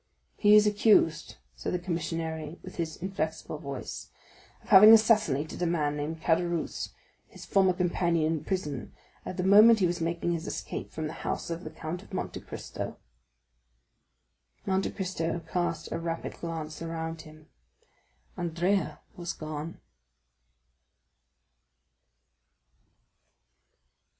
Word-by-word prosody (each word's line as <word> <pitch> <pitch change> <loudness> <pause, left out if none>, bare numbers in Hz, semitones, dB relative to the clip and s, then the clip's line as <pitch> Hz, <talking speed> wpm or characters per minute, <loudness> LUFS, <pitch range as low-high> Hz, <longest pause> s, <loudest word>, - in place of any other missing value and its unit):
"He 210 0 +6
is 210 0 +7
accused," 205 -6 +3 0.2
said - - -3
the - - +2
commissary 165 -2 -3
with - - -10
his 165 -2 -2
inflexible 160 -4 -4
voice, 140 -4 -6 0.5
"of - - -18
having 210 +3 +10
assassinated 215 - +3
the 175 - +1
man 150 -4 0
named 155 +2 -4
Caderousse, 170 0 0 0.4
his - - -12
former 190 -2 +4
companion 175 -2 +1
in 160 - -3
prison, 150 -9 -3 0.3
at 185 - -5
the 180 - -1
moment 210 +4 +8
he 195 - +2
was 175 0 -1
making 170 +1 -1
his 170 0 -3
escape - - -5
from 155 - -4
the 155 - -4
house - - -3
of 165 +2 -4
the 155 - -6
Count 160 +2 -6
of 200 -1 -10
Monte - - -3
Cristo." - - -7 1.7
Monte 190 0 +1
Cristo 170 -3 -2
cast 175 -1 -2
a 165 - -2
rapid 165 0 -4
glance 160 -2 -5
around 165 -1 -4
him. 155 0 -15 0.9
Andrea 170 -2 0
was 175 -1 -4
gone. 155 +1 -6
170 Hz, 125 wpm, -29 LUFS, 160-185 Hz, 1.7 s, having